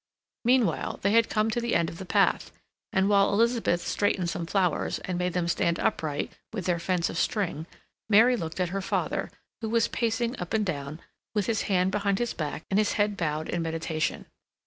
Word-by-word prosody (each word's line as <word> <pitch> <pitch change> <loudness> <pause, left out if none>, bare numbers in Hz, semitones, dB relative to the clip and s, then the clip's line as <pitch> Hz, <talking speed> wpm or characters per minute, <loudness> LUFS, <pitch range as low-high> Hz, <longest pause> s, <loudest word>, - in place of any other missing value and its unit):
Meanwhile, 230 - +2
they 200 - +3
had 230 +1 +4
come 215 +1 +1
to 240 +1 -1
the 235 0 0
end 170 -1 +2
of 165 - -8
the 190 - -7
path, - - +2 0.4
and 190 +1 +2
while 200 -1 +4
Elizabeth 230 -5 +2
straightened 185 -4 0
some 165 0 -4
flowers, 180 -3 +1
and 185 - -2
made 180 0 -1
them 180 -2 0
stand 170 0 +1
upright 155 -9 -1 0.2
within 205 -5 -4
their 170 - -1
fence 175 -1 0
of 170 - -3
string, 170 -7 -1 0.4
Mary 225 +4 +6
looked 165 -5 -5
at 180 -1 +1
her 195 +2 -2
father, - - -1 0.3
who 220 - -3
was 230 0 +3
pacing 235 +1 -1
up 180 +4 -3
and 215 -1 +1
down, 150 -2 -4 0.3
with 205 -2 +1
his 220 0 0
hand 185 -1 +2
behind 200 -1 +1
his 240 +1 -1
back 155 -1 -4
and 195 - +3
his 215 - +2
head 205 -1 +1
bowed 155 -3 -2
in 175 - -2
meditation. 160 -1 -2
190 Hz, 200 wpm, -27 LUFS, 170-220 Hz, 0.4 s, Mary